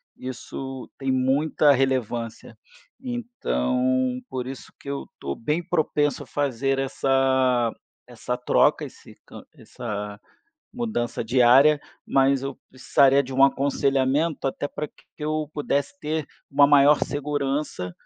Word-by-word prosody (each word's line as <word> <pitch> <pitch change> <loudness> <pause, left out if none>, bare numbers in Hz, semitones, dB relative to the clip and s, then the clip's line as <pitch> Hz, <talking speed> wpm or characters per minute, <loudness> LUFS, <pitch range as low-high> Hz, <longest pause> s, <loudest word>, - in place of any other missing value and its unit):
isso 130 +1 -7
tem 135 -1 -1
muita 140 +3 +3
relevância. 120 -4 -2 0.4
Então 130 - -1
por 130 -1 -4
isso 135 0 -9
que 140 - -9
eu 140 - -4
tô 70 0 -4
bem 150 +9 -1
propenso 155 -4 0
a - - -17
fazer 135 -1 -1
essa 130 -3 +1 0.3
essa 125 +1 -4
troca, 125 - +2
esse - - -14
can - - -12
essa 105 -3 -6 0.5
mudança 220 - -3
diária, 130 +5 +5 0.2
mas 135 0 +2
eu 135 -1 -4
precisaria 135 +1 +3
de 130 +1 -8
um 135 +1 +4
aconselhamento, 140 +2 +1
até 145 +2 -3
pra 150 - -5
que - - -26
eu 155 0 -2
pudesse 145 +4 -2
ter 155 -2 -3 0.2
uma 140 0 +6
maior 145 0 +6
segurança, 145 -8 -3
135 Hz, 125 wpm, -24 LUFS, 125-145 Hz, 0.5 s, uma